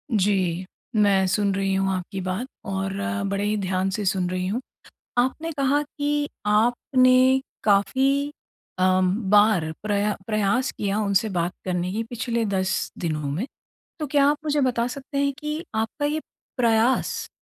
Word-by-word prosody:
जी, 185 -3 +1 0.3
मैं 200 -2 +4
सुन 200 +1 +1
रही 195 0 0
हूँ 195 0 +1
आपकी 185 +1 -4
बात 185 +8 -3 0.2
और 195 0 -2 0.4
बड़े 200 +1 -1
ही 210 +1 +1
ध्यान 190 -1 0
से 205 +2 -2
सुन 185 -1 +1
रही 185 0 -2
हूँ। 230 +6 -1 0.6
आपने 285 +7 0
कहा 285 0 +1
कि 290 0 -2 0.2
आपने 255 +4 +4 0.2
काफ़ी 265 +8 +2 0.5
अम, 185 0 +3 0.2
बार 205 -6 +4
प्रया 205 0 +1
प्रयास 215 +4 +1
किया 205 +1 -2
उनसे 205 +1 +1
बात 175 -1 -1
करने 180 0 -1
की 225 - -1
पिछले 230 0 -2
10 190 -1 -1
दिनों 150 -4 -2
में। 185 - -2 0.6
तो 300 - -1
क्या 280 0 +3
आप 295 - +3
मुझे 295 -1 +1
बता 245 -2 +1
सकते 275 +2 -5
हैं 280 0 +2
कि 300 +3 -4
आपका 225 +7 -2
ये 310 +1 -1 0.4
प्रयास 235 +1 +2
210 Hz, 150 wpm, -24 LUFS, 190-260 Hz, 0.6 s, मैं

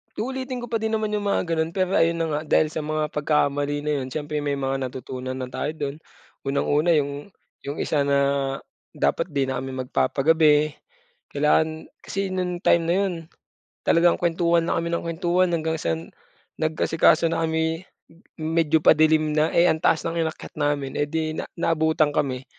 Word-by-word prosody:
Uulitin 260 +2 -4
ko 240 - -7
pa 225 - +1
din 220 0 -1
naman 215 -1 -1
'yung 205 -1 -2
mga 200 - +1
gano'n, 165 -1 -2
pero 185 -1 +1
ayun 165 +1 +3
na - - 0
nga, 150 0 -1
dahil 155 0 +3
sa - - -5
mga 155 0 -2
pagkakamali 145 -1 0
na 150 - -1
'yun, 130 - -4
siyempre 150 0 -3
may 145 -1 -1
mga 135 -1 -2
natutunan 130 +1 -6
na 130 -1 -5
tayo 150 +4 -3
do'n. 145 -2 -4 0.5
Unang-una 145 +4 +2
'yung 145 +5 -2 0.3
'yung 140 - -3
isa 145 -2 0
na 140 0 +3 0.8
dapat 165 - 0
'di 135 -1 0
na 130 - -2
kami 130 0 -5
magpapagabi. 150 +4 +2 0.6
Kailangan 155 +2 +1
kasi 195 -1 -4
no'ng 180 -1 -3
time 170 -1 +4
na 170 - +2
'yun, 195 0 +1 0.7
talagang 170 +1 +4
kuwentuhan 170 0 +2
na - - +1
kami 165 - -3
ng - - -1
kuwentuhan 175 +2 +1
hanggang 160 -1 -1
sa 80 -1 0 0.6
nag-asikaso 160 +1 +3
na 165 0 -1
kami 160 +1 -1 0.6
m - - -4
medyo 160 -1 +3
padilim 155 0 +4
na, 155 +1 +3
eh, 170 - +4
ang 160 - +1
taas 160 - +2
ng 165 0 -1
inakyat 160 - -10
namin, 145 -2 0
eh, 145 - 0
di 160 0 -2
na - - -5
naabutan 160 -2 +1
kami. 130 -3 -1
155 Hz, 180 wpm, -24 LUFS, 145-170 Hz, 0.8 s, time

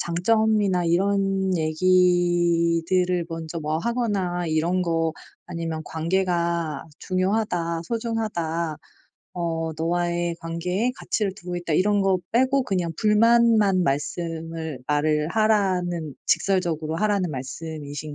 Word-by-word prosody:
장점이나 200 +1 +2
이런 195 +2 +1
얘기들을 175 +1 +2
먼저 165 0 -5
뭐 155 +1 -1
하거나 195 -5 -1
이런 165 +4 +1
거 165 -2 0 0.3
아니면 165 -2 -4
"관계가 170 -2 -1 0.2
중요하다. 185 -3 -1
소중하다. 175 -8 -2 0.6
어 165 -2 -2
너와의 175 +1 -1
관계에 180 +8 -1
가치를 210 -3 -1
두고 180 -3 -6
있다." 175 -3 -2
이런 205 +3 +3
거 195 -1 +2
빼고 260 +3 +3
그냥 180 -7 -1
불만만 215 -3 +4
말씀을 160 +1 -3
말을 150 +1 +1
하라는 180 -7 +1
직설적으로 165 -5 0
하라는 200 -4 +1
말씀이신 145 +2 -6
175 Hz, 255 characters per minute, -24 LUFS, 165-195 Hz, 0.6 s, 불만만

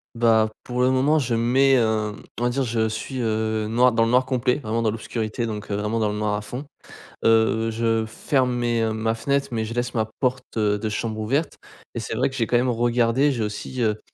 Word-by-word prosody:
Bah, 115 -2 +3
pour 125 0 -2
le 125 - +4
moment, 135 +4 +3
je 125 -4 -1
me - - 0
mets, 135 +3 +4
hem 110 -4 +1 0.2
on 120 - -2
va 120 - +3
dire 135 +3 0
je 115 -2 0
suis, 125 +4 -5
heu, 110 -1 -1
noir 125 +3 +4
dans 115 0 +2
le - - 0
noir 125 +2 +3
complet, 125 -1 +1
vraiment 115 -3 -2
dans 110 - +2
l'obscurité, 110 +1 -3
donc, 105 -2 -5
heu, 100 - -1
vraiment 105 +2 -1
dans 110 -1 +1
le 105 - -3
noir 105 0 0
à 105 - -3
fond. 120 +7 -7 0.6
Heu, 115 0 +3
je 115 0 0
ferme 125 +3 0
mes, 120 -1 0
heu, 110 -1 0
ma 110 +1 0
fenêtre, 140 +4 0
mais 110 -2 -1
je 115 - -6
laisse 120 +1 -2
ma 110 -2 +1 0.2
porte 125 -2 -2
de 105 0 +1
chambre 110 +1 -3
ouverte 135 +9 -1 0.4
et - - -2
c'est - - -5
vrai - - +1
que 130 - -10
j'ai 115 -4 0
quand 120 - 0
même 125 +1 +3
regardé, 120 +3 +2
j'ai 115 -4 -2
aussi, 105 +4 -4
heu 110 -2 +1
115 Hz, 240 wpm, -23 LUFS, 110-125 Hz, 0.6 s, le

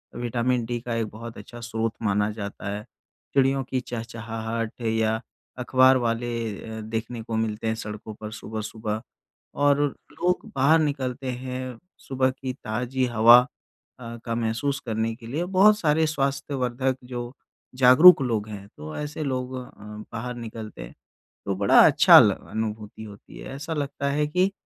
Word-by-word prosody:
Vitamin 120 0 0
D 120 0 -3
का 120 -1 -3
एक 115 -1 -1
बहुत 115 +2 -9
अच्छा 120 - -10
स्रोत 115 -1 -2
माना 105 0 +1
जाता 100 -1 -6
है। 105 - -6 0.5
चिड़ियों 135 0 +3
की 130 0 -2
चहचहाहट 115 -1 -5
या 110 0 0 0.4
अखबार 130 +1 +5
वाले 120 0 -1 0.5
अ, - - -6
देखने 115 +2 -4
को 115 0 -5
मिलते 110 0 -2
हैं 110 - 0
सड़कों 105 0 -7
पर 110 0 -6
सुबह-सुबह 110 0 -5 0.6
और 145 0 +4 0.3
लोग 180 0 -1
बाहर 140 +5 +5
निकलते 135 -4 -2
हैं 130 -1 -5 0.2
सुबह 130 -1 0
की 130 0 -5
ताजी 125 +2 -2
हवा 120 0 +7 0.6
अ, 115 -1 -8
का 115 -1 -2
महसूस 120 +5 -1
करने 110 0 -1
के 115 -1 -12
लिए, 150 +9 -2
बहुत 195 +3 +5
सारे 160 -1 +2
स्वास्थ्यवर्धक 135 -3 -1
जो 120 -1 -5 0.4
जागरूक 135 +6 +8
लोग 110 -4 -1
हैं 100 -1 -8
तो 75 +1 -8
ऐसे 150 +1 -4
लोग 130 -2 -3
अ, 130 - -5 0.5
बाहर 120 +2 -4
निकलते 110 - -8
हैं - - -11 0.5
तो 100 - -1
बड़ा 100 +1 +5
अच्छा - - +8
ल - - +6 0.2
अनुभूति 110 -1 -5
होती 105 -2 -12
है। - - -8
ऐसा 145 +4 -5
लगता 140 -1 -2
है 150 +1 +1
कि 180 +5 +1
120 Hz, 155 wpm, -25 LUFS, 110-135 Hz, 0.6 s, जागरूक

